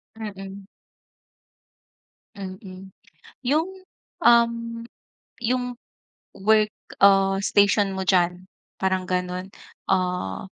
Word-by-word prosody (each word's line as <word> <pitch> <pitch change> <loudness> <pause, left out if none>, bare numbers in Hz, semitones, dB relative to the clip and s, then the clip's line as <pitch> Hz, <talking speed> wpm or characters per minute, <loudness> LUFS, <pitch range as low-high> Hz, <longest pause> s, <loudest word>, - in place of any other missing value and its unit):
Mm. 195 -2 -8 1.7
Mm, 190 -1 -9 0.5
yung, 305 +7 +1 0.5
um, 235 -1 +3 0.6
yung 245 +1 -1 0.6
work, 215 +1 +3 0.3
ah, 195 -1 +5
station 200 0 +3
mo 190 - -2
diyan 180 -1 +1 0.3
parang 190 -1 0
ganun, 180 0 -2 0.4
ah, 180 - 0
195 Hz, 75 wpm, -24 LUFS, 185-225 Hz, 1.7 s, ah